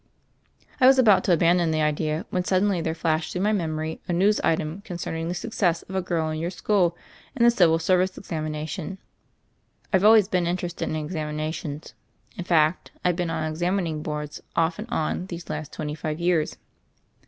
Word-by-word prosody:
I 255 - +6
was 265 0 +7
about 220 -7 +5
to - - +2
abandon 170 0 +3
the 155 -1 +1
idea 155 +1 -1
when 180 - 0
suddenly 185 0 +1
there 160 0 -2
flashed 160 -1 -1
through 180 - -1
my 210 - +3
memory 160 -5 -2
a 175 - -1
news 200 +5 +3
item 160 +3 -1
con 175 - -6
cerning 165 -1 -4
the 175 - -2
success 180 -4 0
of 190 - -11
a 190 - 0
girl 165 -3 -1
in 155 - -3
your 170 +2 -2
school 180 -2 +1 0.4
in 240 - +1
the 235 - +7
Civil 170 -8 +4
Service 185 +2 +1
examination. 155 +1 -4 1.0
I've 190 0 +4
always 215 -2 +7
been 180 -4 0
in 175 +1 0
terested 175 -1 -4
in - - -2
examinations; 155 -1 -4 0.4
in 180 - -6
fact, 160 -1 +2 0.2
I've 180 -1 +3
been 175 -1 -2
on 160 -1 -2
examining 165 0 -1
boards 150 -1 -5
off 165 +3 +1
and 225 +3 -6
on 175 -1 -2
these 170 -2 -7
last 155 -1 -5
twenty 150 0 -4
five 155 0 -4
years." 170 -3 +1
170 Hz, 190 wpm, -25 LUFS, 155-185 Hz, 1.0 s, was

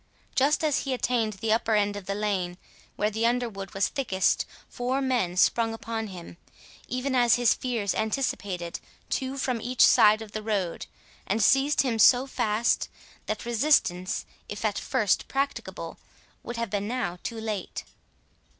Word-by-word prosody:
Just 285 +4 +2
as 300 -3 +2
he 270 - -2
had 250 - -3
attained 230 -3 +1
the 215 +3 0
upper 225 -1 +1
end 205 -1 +1
of 205 -2 -8
the 200 - -1
lane, 190 -4 -1 0.4
where 210 +1 0
the 225 +2 +1
underwood 230 -6 -2
was 195 - +2
thickest, 195 -10 0 0.2
four 250 +2 -2
men 245 -10 0
sprung 225 +3 +3
upon 225 -1 -4
him, 175 -3 -10 0.5
even 255 +2 -2
as 245 -2 +5
his 245 -2 +4
fears 230 -7 -2
anticipated, 200 -7 -2 0.3
two 265 +1 -2
from 255 -3 -1
each 250 +2 +4
side 215 +1 +5
of 215 - -12
the 215 - -4
road, 200 -5 -2 0.4
and 210 +2 +1
seized 270 +6 +4
him 240 -4 -1
so 245 +4 +6
fast, 235 -3 0 0.4
that 215 +1 -3
resistance, 230 -7 +1 0.2
if 210 +1 -5
at 210 -2 0
first 205 -4 +1
practicable, 275 +1 -3 0.4
would 240 - -6
have 230 -3 -3
been 205 0 -1
now 210 -8 -2
too 230 -1 -5
late. 215 -3 -4
225 Hz, 160 wpm, -27 LUFS, 205-250 Hz, 0.5 s, so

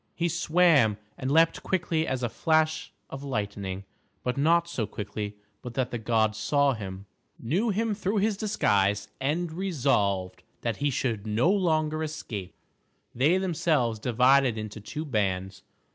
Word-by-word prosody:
He 170 0 0
swam 165 - +4 0.2
and 130 - -4
leaped 165 +3 +4
quick 185 -2 -2
as 145 -6 0
a - - +2
flash 155 +4 +1 0.2
of 135 0 -6
lightning, 100 -6 -3 0.4
but 125 - -1
not 165 +4 +3
so 120 -11 -2
quickly 105 0 -5 0.3
but 120 -2 -8
that 130 -2 -1
the 120 - -3
gods 110 -1 +1
saw 140 +3 +2
him, 95 -3 -7 0.3
knew 180 - 0
him 220 +2 0
through 205 +1 -1
his 210 +1 +2
disguise, 105 - +1
and 155 +5 -1
resolved 105 - 0 0.2
that - - -2
he 145 - +1
should 115 -5 -2
no 115 - +3
longer 155 -5 +1
escape. 110 - -5 0.6
They 145 +9 +3
themselves 160 - +1
divided 125 +1 +3
into 110 0 -6
two 155 +9 -5
bands. 95 - -1
135 Hz, 145 wpm, -27 LUFS, 105-165 Hz, 0.6 s, swam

